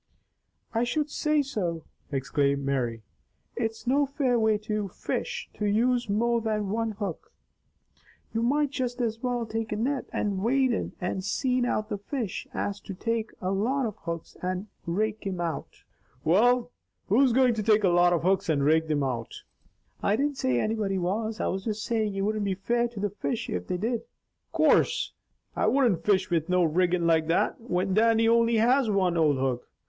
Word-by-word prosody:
"I 230 +1 +2
should 295 +5 -1
say 300 -1 +1
so!" 180 - -3 0.3
exclaimed 140 0 0
Mary. 120 -5 -1 0.5
"It's 225 0 -3
no 280 +3 +2
fair 260 -3 +1
way 220 -1 +3
to 210 -1 -1
fish, 180 - -4
to 210 - -2
use 240 +2 +2
more 235 +3 +1
than 215 -2 -1
one 225 0 -1
hook. 200 -5 -5 1.0
You 225 - 0
might 285 +4 +2
just 255 -3 -3
as 230 -2 -1
well 245 -2 -1
take 225 0 -4
a - - 0
net 255 +5 -1
and 200 -2 -1
wade 260 +5 +2
in - - -3
and 185 0 -2
seine 250 +5 0
out 215 -2 -1
the 205 - -3
fish 225 -1 -4
as 200 0 -3
to 195 - -8
take 225 +2 -2
a 185 - -1
lot 245 +8 0
of 215 -3 -3
hooks 170 -3 -6
and 185 +2 -2 0.2
rake 215 +5 0
thim 190 -3 -3
out." 170 -2 -4 0.4
"Well, 240 +9 +3 0.4
who's 250 +6 +4
going 255 0 +4
to 220 - -2
take 215 0 +3
a 190 - +5
lot 175 0 +4
of 170 -2 +1
hooks 190 +1 +1
and 145 -3 +2
rake 160 +2 +3
thim 150 -2 0
out?" 120 -4 -4 0.6
"I 200 - +2
didn't 285 +3 -1
say 125 -2 +1
anybody 210 - 0
was. 215 +5 -2
I - - -1
was 190 +1 -2
just 215 -2 -2
saying 215 -3 0
it 195 - -1
wouldn't 215 +1 0
be 195 -2 0
fair 235 +5 0
to 235 -3 -9
the 205 -1 -1
fish 230 +3 -3
if 90 0 -3
they 180 - -1
did." 230 +5 -1 0.5
"Course - - +3 0.4
I - - +1
wouldn't 240 -11 +2
fish 190 -2 +2
with 165 0 0
no 180 0 +3
riggin' 175 +1 +2
like 160 -1 +3
that, 165 +7 +1
when 190 -4 -1
Dannie 225 +2 +4
only 230 0 +4
has 245 +2 +3
one 190 -4 +2
old 155 -4 +3
hook. 130 -2 -2
210 Hz, 185 wpm, -27 LUFS, 180-235 Hz, 1.0 s, a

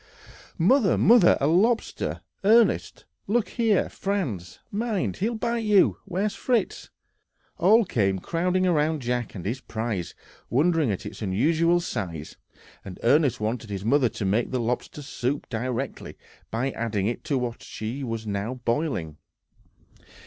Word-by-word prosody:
"Mother, 215 +4 +4
mother! 225 -4 +6
a 140 - +1
lobster, 210 +10 +1 0.2
Ernest! 225 +3 +3 0.2
look 220 +2 +1
here, 225 -5 +2
Franz! 140 - -3
mind, 215 -2 -1
he'll 225 +5 -1
bite 235 +1 -1
you! 210 -3 +4
Where's 200 +4 -1
Fritz?" 245 -3 -1 0.7
All 210 +6 +5
came 100 - +1
crowding 180 - 0
round 155 -4 +1
Jack 120 -1 -2
and 90 - -7
his 120 +6 -3
prize, 110 -7 -4 0.3
wondering 155 +1 +2
at 100 - -3
its - - -8
unusual 160 - +2
size, 85 - -5 0.5
and 95 -2 -9
Ernest 130 0 +3
wanted 110 +1 -3
his 100 0 -5
mother 130 +1 +3
to 105 - -5
make 105 +5 +1
lobster 125 +4 -2
soup 135 0 -3
directly, 125 +3 -4 0.3
by 125 +4 -1
adding 110 -5 -2
it 120 +3 -2
to 145 -4 0
what 125 -2 -3
she 115 +6 -5
was 115 -3 -4
now 105 +4 -3
boiling. 120 - -2
135 Hz, 135 wpm, -25 LUFS, 110-185 Hz, 0.7 s, mother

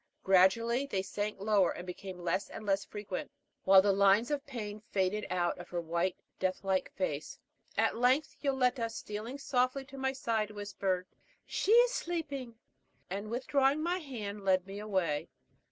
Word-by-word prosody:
Gradually 230 +8 +4
they 190 -8 -1
sank 205 +1 -3
lower, 200 -3 +3
and 175 - -5
became 185 +1 -7
less 180 +2 -1
and 215 - -8
less 195 -1 +1
frequent, 205 -3 -5 0.4
while 190 0 +8
the 200 - +4
lines 200 +5 +4
of 285 -1 -1
pain 215 -5 -5
faded 200 +2 0
out 175 -1 +1
of 175 - -9
her 175 - -2
white, 170 +2 0 0.2
death 185 0 -1
like 190 -1 0
face. 155 -6 -3 0.4
And - - +4
at - - 0
length 255 +5 +2
Yoletta, 255 -4 +1
stealing 225 +3 -6
softly 260 0 0
to 275 0 -10
my 265 0 0
side, 225 -5 -1
whispered, 200 -3 -2 0.4
"She 410 - 0
is 480 +1 +7
sleeping," 285 - -3 0.6
and 200 +3 -4
withdrawing 270 +4 +2
my 350 +2 0
hand, 210 - -6
led 185 -1 +3
me 195 +1 -7
away. 190 -8 -1
210 Hz, 165 wpm, -32 LUFS, 190-255 Hz, 0.6 s, while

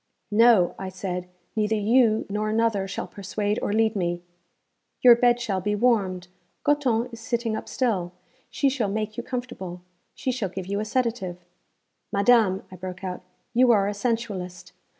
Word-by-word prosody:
'No!' 220 -4 +5
I 190 - -4
said. 180 -1 -5 0.3
'Neither 215 0 +1
you 220 +1 +3
nor 210 +1 -2
another 220 -3 +1
shall 195 - -4
persuade 205 +1 -3
or - - -1
lead 220 +1 +2
me.' 175 -2 -1 0.8
'Your 245 -2 +10
bed 240 0 +3
shall 195 -5 -2
be 210 +2 0
warmed. 200 -6 +1 0.4
Goton 250 -5 +1
is 230 - -8
sitting 230 0 -2
up - - -6
still. 195 -9 0 0.4
She 280 - +1
shall 255 -6 0
make 215 +1 -3
you 240 - -3
comfortable. 240 -9 -6 0.3
She 260 - -1
shall 235 -6 -2
give 185 +1 -6
you 200 +2 -2
a 215 - -2
sedative.' 210 -7 -2 0.7
'Madame,' 200 -2 +3
I 185 - -9
broke 180 +1 -7
out, 180 -1 -4 0.3
'you 250 +1 +5
are 200 -3 +3
a 205 - -1
sensualist. 205 -5 -3
210 Hz, 165 wpm, -25 LUFS, 190-235 Hz, 0.8 s, Your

